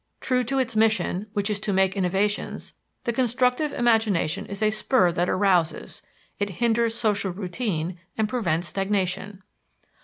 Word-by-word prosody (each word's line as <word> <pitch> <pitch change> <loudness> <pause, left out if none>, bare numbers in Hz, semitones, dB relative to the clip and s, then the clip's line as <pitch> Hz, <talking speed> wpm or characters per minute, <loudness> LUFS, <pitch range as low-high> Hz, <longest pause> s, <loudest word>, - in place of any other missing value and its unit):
True 250 -1 +1
to 270 +4 -1
its 255 -3 0
mission, 215 -3 +1
which 205 -2 0
is 210 -2 -1
to 205 - -2
make 190 0 +2
innovations, 195 +2 -1 0.3
the 235 - -1
constructive 250 +4 +1
imagination 225 - +1
is 200 +2 -4
a 215 - +3
spur 215 -3 +2
that 175 +1 0
arouses; 185 -4 +1 0.4
it 205 0 0
hinders 230 +3 +1
social 205 -4 0
routine 180 -2 -3 0.2
and 220 -1 +1
prevents 175 -8 -1
stagnation. 195 +1 -2
205 Hz, 145 wpm, -25 LUFS, 185-230 Hz, 0.4 s, a